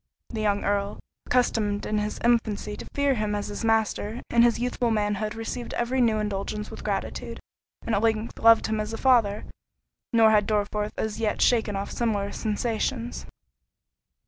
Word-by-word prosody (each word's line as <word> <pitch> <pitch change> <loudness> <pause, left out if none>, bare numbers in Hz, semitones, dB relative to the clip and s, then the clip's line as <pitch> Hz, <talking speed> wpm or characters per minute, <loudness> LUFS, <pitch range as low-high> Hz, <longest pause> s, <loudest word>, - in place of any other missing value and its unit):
The 220 -2 -4
young 205 -1 +1
Earl, 200 0 -1 0.3
accustomed 215 -5 +1
in 215 - 0
his 210 0 -3
infancy 220 -3 +1
to - - -9
fear 280 -1 +2
him 215 -3 -1
as 205 - -3
his 205 - -5
master, 225 0 0
in 235 - +5
his 235 -1 +4
youthful 245 0 -1
manhood 210 0 -1
received 230 +2 -5
every 250 +2 0
new 225 -3 +3
indulgence 210 0 -3
with - - -9
gratitude, - - -3 0.5
and 230 - -1
at 200 - +2
length 225 0 0
loved 230 0 +6
him 220 0 -1
as 215 +1 -3
a - - -3
father—nor 225 -1 +1
had 210 -2 +3
Dorriforth 210 0 -1
as 220 0 -3
yet 215 -2 0
shaken 225 -4 +2
off 195 +1 -4
similar 205 -4 -1
sensations. 230 +2 -2
220 Hz, 165 wpm, -26 LUFS, 210-235 Hz, 0.5 s, loved